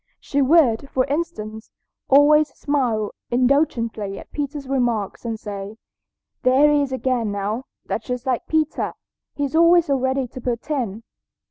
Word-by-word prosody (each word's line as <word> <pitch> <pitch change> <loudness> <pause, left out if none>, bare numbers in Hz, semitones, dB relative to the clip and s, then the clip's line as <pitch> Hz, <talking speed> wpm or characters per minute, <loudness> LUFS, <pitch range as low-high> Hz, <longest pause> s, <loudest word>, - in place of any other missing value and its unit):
She 285 - -1
would, 275 -3 +3
for 255 -2 +1
instance, 275 -8 -4 0.4
always 295 +2 +6
smile 245 -8 0 0.2
indulgently 240 -6 +1
at - - -11
Peter's 285 -1 -4
remarks 240 -6 -1
and 225 -2 -3
say, 205 0 -7 0.6
"There 270 +4 +5
he 295 -1 +3
is 280 -2 -2
again, 255 -4 -1
now; 205 +5 -3 0.2
that's 220 - -4
just 250 -1 -3
like 255 -3 -1
Peter. 315 -1 0 0.4
He's 285 +1 -2
always 335 +1 +6
so 280 -3 +1
ready 260 0 0
to 255 - -9
put 240 +4 -3
in." 230 -7 -2
260 Hz, 145 wpm, -22 LUFS, 225-285 Hz, 0.6 s, always